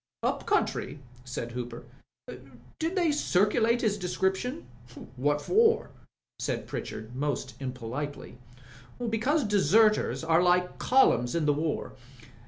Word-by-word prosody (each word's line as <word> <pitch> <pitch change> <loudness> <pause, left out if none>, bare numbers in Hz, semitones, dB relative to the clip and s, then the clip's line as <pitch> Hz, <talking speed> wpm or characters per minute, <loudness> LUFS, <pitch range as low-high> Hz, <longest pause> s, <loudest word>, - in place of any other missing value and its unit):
"Up - - -1
country?" - - 0 0.3
said 120 -2 -5
Hooper. 120 -1 -6 1.0
"Did 330 +3 -1
they 345 -4 +2
circulate 230 -2 +2
his 210 -2 0
description?" 190 - -1 0.3
" - - -16 0.2
What 145 +3 0
for? 450 +3 +3 0.2
" - - -65 0.2
said - - -2
Pritchard, 110 +3 -6
most 140 0 -2
impolitely. 130 +1 -6 0.7
"Because 270 +8 +1
deserters 210 -1 +3
are 165 +1 +3
like 180 0 +2
columns 210 - +3
in 165 -2 +1
the 145 - +4
war. 155 +1 -2
180 Hz, 120 wpm, -28 LUFS, 135-225 Hz, 1.0 s, the